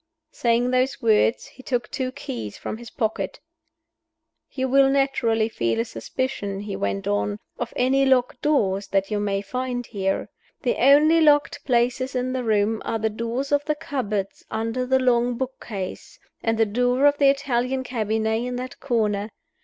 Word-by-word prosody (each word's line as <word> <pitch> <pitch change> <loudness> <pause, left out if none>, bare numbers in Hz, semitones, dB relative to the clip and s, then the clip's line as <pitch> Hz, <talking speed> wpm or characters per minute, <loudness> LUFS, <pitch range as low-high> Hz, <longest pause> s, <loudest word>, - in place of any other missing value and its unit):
Saying 240 +1 +1
those 255 +1 +1
words, 225 +1 +3
he - - -14
took 245 -2 -2
two 255 -1 -2
keys 115 - -6
from - - -5
his 235 0 -10
pocket. 220 -1 -2 1.1
"You 260 -1 -2
will 270 +1 +5
naturally 255 -5 +2
feel 115 - -1
a 115 - +1
suspicion," 200 - -4
he 205 -1 -5
went 100 0 -2
on, 100 0 0 0.2
"of 240 -1 -3
any 265 +2 +3
locked 255 -2 +2
doors 205 -11 +1
that 195 +1 0
you 210 - 0
may 200 -1 -1
find 250 +1 -3
here. 195 -4 -2 0.4
The 245 - +1
only 300 +5 +6
locked 295 -2 +3
places 250 +1 +1
in 255 0 -1
the 260 -1 -2
room 215 0 +1
are 225 - -1
the 220 0 -1
doors 235 +5 -3
of 290 0 +3
the 300 - 0
cupboards 215 -10 -3
under 230 +3 -2
the 265 +1 +4
long 245 -1 +2
book 260 0 -5
case, 195 -5 -6 0.2
and 225 0 0
the 225 - +4
door 245 +5 +1
of 290 0 +4
the 280 -1 +6
Italian 265 -2 0
cabinet 220 -2 -1
in 250 0 -3
that 255 +1 -6
corner. 215 -5 0
240 Hz, 170 wpm, -24 LUFS, 215-260 Hz, 1.1 s, only